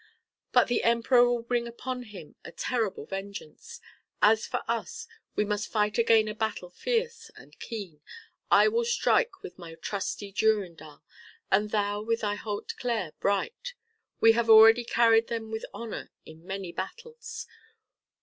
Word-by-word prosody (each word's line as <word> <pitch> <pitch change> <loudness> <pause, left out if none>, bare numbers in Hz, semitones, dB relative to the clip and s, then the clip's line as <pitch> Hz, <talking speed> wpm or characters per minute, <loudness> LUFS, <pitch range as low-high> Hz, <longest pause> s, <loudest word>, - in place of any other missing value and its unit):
But - - +4
the 245 - +1
Emperor 235 +1 +4
will 240 -1 -1
bring 235 0 -1
upon 250 +2 -5
him 200 -10 -11
a - - -9
terrible 225 -2 -2
vengeance. 200 - -8 0.4
As 220 +1 +4
for - - -3
us, 455 -1 -3 0.3
we 210 - +1
must 210 0 -2
fight 210 0 +1
again 225 -1 +4
a 215 - -3
battle 210 -4 -3
fierce 465 - -2
and - - -17
keen. 195 -10 -7 0.5
I - - +6
will 460 +2 +1
strike 470 -3 +1
with 400 - -10
my 165 -2 -10
trusty 200 +2 -4
Durindal 180 -9 -1 0.5
and 210 +2 +3
thou 205 -1 -1
with 230 +1 -1
thy 205 -1 0
Hauteclere 210 -2 -3
bright. 470 - -2 0.4
We 225 - +7
have 230 0 0
already 225 +2 +8
carried 230 -1 +4
them 225 -2 -4
with 220 0 -4
honor 230 -2 -7 0.2
in 160 +2 -14
many 190 -2 -5
battles. 465 - -7
225 Hz, 150 wpm, -28 LUFS, 200-245 Hz, 0.5 s, already